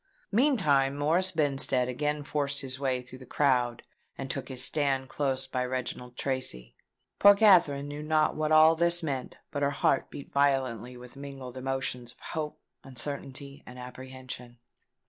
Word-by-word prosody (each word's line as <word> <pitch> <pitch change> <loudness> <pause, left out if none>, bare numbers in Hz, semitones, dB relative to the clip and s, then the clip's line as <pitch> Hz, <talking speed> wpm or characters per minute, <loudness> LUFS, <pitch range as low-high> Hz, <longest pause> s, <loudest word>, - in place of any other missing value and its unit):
Meantime 155 - +3
Morris 170 +6 +2
Benstead 135 -5 +1
again 150 +4 -2
forced 145 -1 0
his 130 -1 +1
way 130 -2 -1
through 130 +1 -12
the 130 - -11
crowd, 125 -4 +1 0.3
and 135 -1 -3
took 135 - -4
his 130 -1 -4
stand 135 -3 0
close 135 -2 -1
by 130 -1 -2
Reginald 125 -1 -4
Tracy. 130 - -2 0.4
Poor 200 0 +8
Katherine 175 -9 +5
knew 145 +1 -6
not 155 0 +2
what 155 0 -1
all 155 +1 +7
this 170 +1 +2
meant; 135 -5 -4
but 145 -2 -3
her 140 - +3
heart 140 -1 +1
beat 140 - -10
violently 130 -4 +1
with 125 +1 -13
mingled 135 -3 -8
emotions 130 -2 -3
of - - -30
hope, 155 -2 -5 0.2
uncertainty, 140 +1 -6
and 125 - -10
apprehension. 125 -1 -9
135 Hz, 155 wpm, -29 LUFS, 130-150 Hz, 0.4 s, Poor